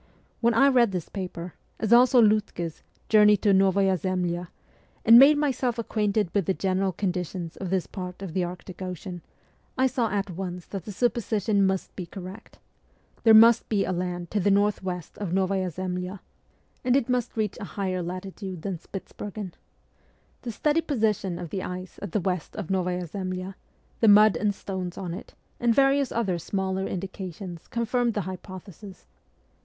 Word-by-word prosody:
When 235 Hz, -1 st, +2 dB
I 275 Hz, +4 st, +6 dB
read 240 Hz, -6 st, +4 dB
this 180 Hz, -3 st, -4 dB
paper, 180 Hz, -3 st, -6 dB, 0.3 s
as 220 Hz, +1 st, +2 dB
also 250 Hz, +1 st, +6 dB
Liitke's 210 Hz, -7 st, +1 dB
' -, -, -36 dB
Journey 210 Hz, -1 st, +7 dB
to 200 Hz, 0 st, +3 dB
Novaya 195 Hz, 0 st, +3 dB
Zemlya,' 180 Hz, -1 st, -2 dB, 0.6 s
and 230 Hz, +1 st, +10 dB
made 290 Hz, +3 st, +8 dB
myself 260 Hz, -4 st, 0 dB
ac 230 Hz, -, -3 dB
quainted 210 Hz, -3 st, 0 dB
with 200 Hz, -5 st, +1 dB
the 190 Hz, -, +1 dB
general 190 Hz, 0 st, 0 dB
conditions 180 Hz, -2 st, -3 dB
of 190 Hz, -, -5 dB
this 185 Hz, -1 st, 0 dB
part 180 Hz, 0 st, -7 dB
of 180 Hz, -5 st, -6 dB
the 185 Hz, 0 st, +1 dB
Arctic 180 Hz, +1 st, -7 dB
Ocean, 180 Hz, -1 st, -6 dB, 0.6 s
I 260 Hz, -, +3 dB
saw 245 Hz, -3 st, +1 dB
at 200 Hz, -1 st, -2 dB
once 180 Hz, 0 st, -5 dB
that 195 Hz, -4 st, -7 dB
the 210 Hz, -, -6 dB
supposition 215 Hz, -2 st, +1 dB
must 190 Hz, -1 st, -2 dB
be 180 Hz, -3 st, -6 dB
correct. 190 Hz, +3 st, -10 dB, 0.6 s
There 225 Hz, -1 st, +7 dB
must 230 Hz, +1 st, +7 dB
be 205 Hz, -3 st, +1 dB
a -, -, -2 dB
land 175 Hz, -1 st, -3 dB
to 210 Hz, -, +1 dB
the 200 Hz, -, +2 dB
north 200 Hz, +1 st, +3 dB
14 -, -, -14 dB
MEMOIRS 180 Hz, -3 st, -3 dB
OF -, -, -24 dB
A -, -, -1 dB
REVOLUTIONIST 185 Hz, -1 st, -1 dB
west -, -, -5 dB
of -, -, -2 dB
N6vaya 180 Hz, -, -2 dB
Zemlya, 185 Hz, +2 st, -6 dB, 0.6 s
and 250 Hz, 0 st, +3 dB
it 270 Hz, -4 st, +2 dB
must 245 Hz, -2 st, -1 dB
reach 215 Hz, -3 st, -1 dB
a -, -, -6 dB
higher 185 Hz, 0 st, -3 dB
latitude 185 Hz, 0 st, -6 dB
than 190 Hz, -4 st, -3 dB
Spitzbergen. 195 Hz, 0 st, -7 dB, 0.9 s
The 240 Hz, -, -5 dB
steady 300 Hz, +8 st, +1 dB
position 215 Hz, -, 0 dB
of 175 Hz, -2 st, -7 dB
the 190 Hz, -, -2 dB
ice 185 Hz, 0 st, -7 dB
at 200 Hz, -, -5 dB
the 210 Hz, -, +1 dB
west 180 Hz, -2 st, -3 dB
of 200 Hz, -4 st, -5 dB
Novaya 180 Hz, -1 st, 0 dB
Zemlya, 185 Hz, +2 st, -5 dB, 0.5 s
the 225 Hz, -, +4 dB
mud 210 Hz, -2 st, +7 dB
and 205 Hz, +3 st, 0 dB
stones 185 Hz, -3 st, -5 dB
on 180 Hz, -3 st, -4 dB
it, 185 Hz, -, -9 dB, 0.2 s
and 235 Hz, -1 st, +2 dB
various 275 Hz, -1 st, +3 dB
other 195 Hz, -7 st, 0 dB
smaller 190 Hz, +2 st, -2 dB
indications 185 Hz, -2 st, -6 dB
confirmed 235 Hz, 0 st, 0 dB
the 205 Hz, -, 0 dB
hypothesis. 185 Hz, +1 st, -9 dB
195 Hz, 185 wpm, -26 LUFS, 180-215 Hz, 0.9 s, and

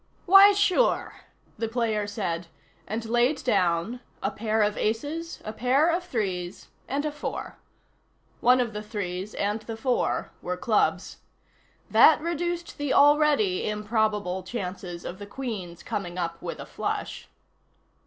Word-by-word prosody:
"Why, 390 Hz, +2 st, +9 dB
sure," 410 Hz, +4 st, +1 dB, 0.4 s
the 225 Hz, -, 0 dB
player 225 Hz, -3 st, 0 dB
said, 180 Hz, -5 st, -3 dB, 0.4 s
and 225 Hz, +2 st, -3 dB
laid 240 Hz, +5 st, +1 dB
down 190 Hz, 0 st, +1 dB, 0.2 s
a -, -, 0 dB
pair 220 Hz, 0 st, 0 dB
of 210 Hz, 0 st, +1 dB
aces, 290 Hz, +10 st, -2 dB
a 215 Hz, -, -4 dB
pair 265 Hz, +8 st, +3 dB
of 350 Hz, +2 st, -1 dB
threes 195 Hz, -, -3 dB, 0.2 s
and 285 Hz, +3 st, -1 dB
a 305 Hz, -, -1 dB
four. 295 Hz, 0 st, -6 dB, 0.8 s
One 250 Hz, +1 st, +5 dB
of 235 Hz, -3 st, -1 dB
the 210 Hz, -, -4 dB
threes, 205 Hz, -2 st, -5 dB
and 205 Hz, +2 st, -1 dB
the 225 Hz, +1 st, -7 dB
four, 250 Hz, +2 st, 0 dB
were 180 Hz, 0 st, -3 dB
clubs. 215 Hz, +3 st, 0 dB, 0.7 s
That -, -, +7 dB
reduced 340 Hz, +1 st, -3 dB
the 290 Hz, -2 st, 0 dB
already 290 Hz, -11 st, +4 dB
improbable 210 Hz, -3 st, 0 dB
chances 185 Hz, -3 st, -6 dB
of 185 Hz, -, -6 dB
the 205 Hz, -, -8 dB
Queen's 200 Hz, -8 st, -6 dB
coming 195 Hz, -5 st, -4 dB
up 170 Hz, -1 st, -3 dB
with -, -, -5 dB
a -, -, -6 dB
flush. -, -, -4 dB
220 Hz, 140 wpm, -26 LUFS, 195-280 Hz, 0.8 s, Why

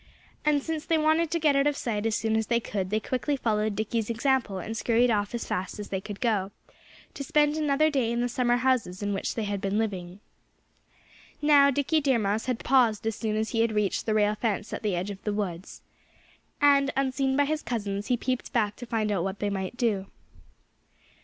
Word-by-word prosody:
And 295 Hz, -2 st, +2 dB
since 320 Hz, -2 st, -3 dB
they 325 Hz, -1 st, +1 dB
wanted 315 Hz, +1 st, +2 dB
to 335 Hz, -, -1 dB
get 300 Hz, -3 st, +3 dB
out 275 Hz, +1 st, +3 dB
of 295 Hz, -1 st, 0 dB
sight 220 Hz, -2 st, -1 dB
as 220 Hz, -, 0 dB
soon 220 Hz, 0 st, 0 dB
as 220 Hz, -1 st, 0 dB
they 235 Hz, 0 st, +2 dB
could, 195 Hz, -4 st, -3 dB
they 215 Hz, +2 st, +1 dB
quickly 260 Hz, +5 st, -2 dB
followed 215 Hz, -3 st, 0 dB
Dickie's 220 Hz, +1 st, -2 dB
example 235 Hz, -3 st, 0 dB
and 215 Hz, +5 st, -5 dB
scurried 235 Hz, +1 st, +2 dB
off 205 Hz, +1 st, 0 dB
as 235 Hz, -, -3 dB
fast 185 Hz, +3 st, -3 dB
as 210 Hz, -1 st, -7 dB
they 190 Hz, -1 st, -2 dB
could 205 Hz, 0 st, -8 dB
go, 215 Hz, -6 st, 0 dB, 0.6 s
to 280 Hz, -, -6 dB
spend 295 Hz, +2 st, +2 dB
another 310 Hz, 0 st, +2 dB
day 255 Hz, -5 st, +1 dB
in 235 Hz, -, -1 dB
the 245 Hz, -, +1 dB
summer 245 Hz, 0 st, +1 dB
houses 245 Hz, -7 st, 0 dB
in 205 Hz, 0 st, -1 dB
which 195 Hz, -, -2 dB
they 225 Hz, -, -2 dB
had 200 Hz, -1 st, -3 dB
been 200 Hz, +1 st, -1 dB
living. 190 Hz, -4 st, -3 dB, 1.2 s
Now, 290 Hz, -2 st, +6 dB
Dickie 285 Hz, +3 st, +1 dB
Deer 270 Hz, -3 st, +2 dB
Mouse 210 Hz, +1 st, -1 dB
had 250 Hz, -3 st, -2 dB
paused 240 Hz, -5 st, +3 dB
as 225 Hz, -1 st, -1 dB
soon 220 Hz, -2 st, -2 dB
as 220 Hz, +1 st, -1 dB
he 225 Hz, -, +1 dB
had 230 Hz, -1 st, +1 dB
reached 210 Hz, 0 st, 0 dB
the 215 Hz, -, +1 dB
rail 210 Hz, -1 st, +3 dB
fence 215 Hz, -1 st, -2 dB
at -, -, -4 dB
the 210 Hz, -4 st, 0 dB
edge 185 Hz, +4 st, -3 dB
of 195 Hz, -, -10 dB
the 210 Hz, -, -1 dB
woods. 190 Hz, -3 st, -5 dB, 0.8 s
And 280 Hz, -1 st, +5 dB
unseen 265 Hz, 0 st, +1 dB
by 285 Hz, -, +4 dB
his 310 Hz, +1 st, -1 dB
cousins 205 Hz, -3 st, -3 dB
he 250 Hz, -, +2 dB
peeped 255 Hz, +1 st, -3 dB
back 210 Hz, -3 st, +1 dB
to 245 Hz, -, -8 dB
find 220 Hz, -2 st, 0 dB
out 190 Hz, -4 st, 0 dB
what 195 Hz, +1 st, -3 dB
they 205 Hz, 0 st, -2 dB
might 195 Hz, +4 st, -4 dB
do. 210 Hz, -6 st, 0 dB
225 Hz, 220 wpm, -27 LUFS, 205-270 Hz, 1.2 s, Now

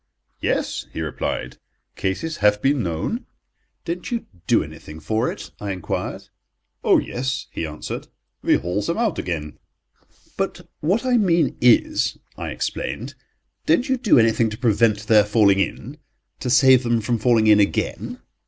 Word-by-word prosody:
"Yes," -, -, -1 dB
he -, -, -6 dB
replied, 75 Hz, -3 st, -4 dB, 0.4 s
"cases 155 Hz, +13 st, -2 dB
have 105 Hz, 0 st, +3 dB
been 135 Hz, +2 st, +2 dB
known." 85 Hz, -, -3 dB, 0.6 s
"Don't 175 Hz, +2 st, -4 dB
you 235 Hz, -2 st, -3 dB, 0.2 s
do -, -, +4 dB
anything 75 Hz, +1 st, -10 dB
for 110 Hz, +10 st, 0 dB
it?" -, -, -9 dB
I 100 Hz, -1 st, -4 dB
enquired. 90 Hz, -3 st, -4 dB, 0.5 s
"Oh, -, -, +5 dB
yes," 130 Hz, +1 st, -2 dB
he 80 Hz, -, -3 dB
answered, 75 Hz, 0 st, -6 dB, 0.3 s
"we -, -, +3 dB
haul 90 Hz, +4 st, -1 dB
them 170 Hz, +11 st, -2 dB
out 225 Hz, -5 st, 0 dB
again." 75 Hz, -4 st, -4 dB, 0.8 s
"But -, -, -3 dB
what 195 Hz, -, 0 dB
I 250 Hz, -1 st, +3 dB
mean 170 Hz, -, +2 dB, 0.2 s
is," -, -, -2 dB, 0.2 s
I -, -, -5 dB
explained, -, -, -4 dB, 0.5 s
"don't 165 Hz, +11 st, +3 dB
you 265 Hz, -, +3 dB
do 240 Hz, -, +3 dB
anything 115 Hz, 0 st, +3 dB
to 105 Hz, -, -7 dB
prevent 110 Hz, -3 st, +2 dB
their 105 Hz, -1 st, +6 dB
falling 100 Hz, -2 st, +3 dB
in—to 130 Hz, +3 st, -6 dB
save 130 Hz, 0 st, +6 dB
them 120 Hz, -2 st, +1 dB
from 115 Hz, +2 st, -1 dB
falling 115 Hz, -1 st, +3 dB
in 105 Hz, -1 st, +6 dB
again?" 100 Hz, -, -1 dB
115 Hz, 150 wpm, -22 LUFS, 100-150 Hz, 0.8 s, their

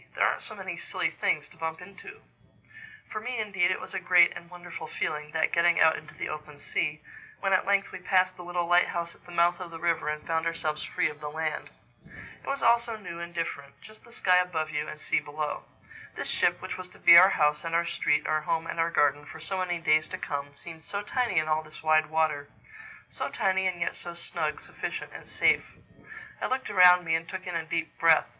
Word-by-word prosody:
There -, -, +3 dB
aren't -, -, 0 dB
so -, -, -9 dB
many -, -, -6 dB
silly -, -, -2 dB
things -, -, 0 dB
to -, -, -19 dB
bump 160 Hz, 0 st, -4 dB
into." 200 Hz, -, -12 dB, 0.9 s
For 215 Hz, -, -4 dB
me 250 Hz, +2 st, -4 dB
indeed 195 Hz, -5 st, +1 dB
it 185 Hz, -, 0 dB
was -, -, -8 dB
a -, -, -1 dB
great 175 Hz, -1 st, +5 dB
and 170 Hz, -, -10 dB
wonderful 175 Hz, -2 st, -8 dB
feeling, 150 Hz, -1 st, -3 dB
that 160 Hz, -, +1 dB
getting 170 Hz, 0 st, +4 dB
out 160 Hz, 0 st, +6 dB
into 155 Hz, -, -10 dB
the -, -, -4 dB
open 150 Hz, -1 st, -7 dB
sea, 150 Hz, +1 st, -2 dB, 0.4 s
when 195 Hz, -1 st, +1 dB
at 190 Hz, -, +2 dB
length 200 Hz, 0 st, +2 dB
we -, -, -7 dB
passed 185 Hz, 0 st, +2 dB
the -, -, -10 dB
little 175 Hz, 0 st, -2 dB
lighthouse 175 Hz, -1 st, +2 dB
at -, -, -23 dB
the -, -, -11 dB
mouth 175 Hz, +1 st, +3 dB
of 180 Hz, -2 st, -6 dB
the 165 Hz, -, -8 dB
river 170 Hz, -2 st, 0 dB
and 150 Hz, 0 st, -4 dB
found 165 Hz, 0 st, 0 dB
ourselves 155 Hz, -2 st, -2 dB
free -, -, 0 dB
of 150 Hz, -1 st, -8 dB
the 150 Hz, -1 st, -5 dB
land. 160 Hz, +1 st, -3 dB, 0.7 s
It -, -, -16 dB
was 275 Hz, 0 st, -2 dB
all 235 Hz, 0 st, +6 dB
so 235 Hz, -1 st, -5 dB
new 180 Hz, -5 st, -8 dB
and 170 Hz, 0 st, -6 dB
different: 150 Hz, -5 st, -5 dB
just 215 Hz, 0 st, -16 dB
the 235 Hz, -, -17 dB
sky 185 Hz, -5 st, +3 dB
above 160 Hz, -4 st, -1 dB
you 150 Hz, 0 st, -2 dB
and 155 Hz, -, -8 dB
sea -, -, +1 dB
below. 150 Hz, 0 st, -4 dB, 0.5 s
This -, -, -3 dB
ship, -, -, +1 dB
which -, -, -5 dB
was 180 Hz, 0 st, -8 dB
to -, -, -17 dB
be 170 Hz, -, +8 dB
our 185 Hz, +3 st, +10 dB
house 150 Hz, -4 st, +2 dB
and 165 Hz, 0 st, -2 dB
our 170 Hz, 0 st, +2 dB
street, 150 Hz, -3 st, +1 dB
our 155 Hz, 0 st, +1 dB
home 165 Hz, +1 st, -1 dB
and 165 Hz, -, -5 dB
our 165 Hz, 0 st, +2 dB
garden, 145 Hz, -3 st, +2 dB
for 145 Hz, -, -10 dB
so 185 Hz, +5 st, -3 dB
many 180 Hz, -1 st, -1 dB
days 155 Hz, -1 st, +2 dB
to -, -, -5 dB
come, 145 Hz, 0 st, -5 dB
seemed 160 Hz, +1 st, -9 dB
so 200 Hz, +7 st, -4 dB
tiny 240 Hz, -3 st, -1 dB
in 155 Hz, 0 st, +3 dB
all 155 Hz, 0 st, +1 dB
this 155 Hz, 0 st, -13 dB
wide 155 Hz, 0 st, +3 dB
water—so 160 Hz, -, -4 dB
tiny 190 Hz, 0 st, +1 dB
and 180 Hz, -2 st, -2 dB
yet 170 Hz, -, -1 dB
so 175 Hz, -1 st, -7 dB
snug, 160 Hz, -3 st, -3 dB
sufficient, -, -, -6 dB, 0.2 s
safe. -, -, +2 dB, 0.7 s
I -, -, 0 dB
looked 260 Hz, 0 st, -2 dB
around 180 Hz, -2 st, +7 dB
me 160 Hz, -, 0 dB
and 165 Hz, 0 st, -1 dB
took 185 Hz, -1 st, -6 dB
in 180 Hz, -, -5 dB
a 165 Hz, -, -1 dB
deep 165 Hz, 0 st, -3 dB
breath. 165 Hz, -1 st, +5 dB
170 Hz, 230 wpm, -28 LUFS, 155-185 Hz, 0.9 s, our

